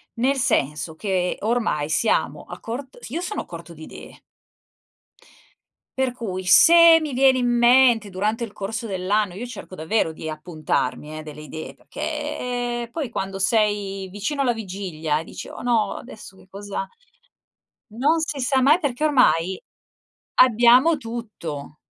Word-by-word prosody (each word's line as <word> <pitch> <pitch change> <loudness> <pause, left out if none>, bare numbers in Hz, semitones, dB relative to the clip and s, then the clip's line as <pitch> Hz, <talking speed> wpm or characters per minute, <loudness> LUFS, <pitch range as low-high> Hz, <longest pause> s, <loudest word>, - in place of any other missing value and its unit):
Nel 260 +4 +1
senso 155 - 0
che 185 -1 -1
ormai 220 -10 0
siamo 215 +7 0
a - - -9
cort 255 +4 -7
io 320 +8 -3
sono 390 +4 -3
a - - -11
corto 170 0 -10
di 160 -1 -12
idee. - - -12 1.8
Per 260 -1 +1
cui 200 -7 -5
se 335 - +8
mi 305 -3 -4
viene 260 +1 +4
in 245 -1 +1
mente 240 -2 +4
durante 210 +5 -2
il 230 - -6
corso 210 +3 -5
dell'anno 195 0 -1
io 210 +7 -6
cerco 245 -6 -9
davvero 160 +2 0
di 160 0 -8
appuntarmi 155 -2 -3
eh - - -8
delle 150 -1 -10
idee, 155 +1 -8
perché 245 -1 -4
poi 295 +1 -3
quando 195 -2 -4
sei 200 -2 0
vicino 210 +10 -3
alla 255 -3 +2
vigilia 180 -8 -3
e - - -9
dici: - - -9
"Oh - - -9
no 235 -3 +1
adesso 220 -5 -11
che 190 - -20
cosa" 200 0 -5 1.1
Non 285 +9 +2
si 305 -3 -3
sa 265 +1 +1
mai 300 +6 +5
perché 285 -4 -2
ormai 190 - +2 0.8
abbiamo 250 +6 +5
tutto. 215 - -7
220 Hz, 150 wpm, -23 LUFS, 185-250 Hz, 1.8 s, se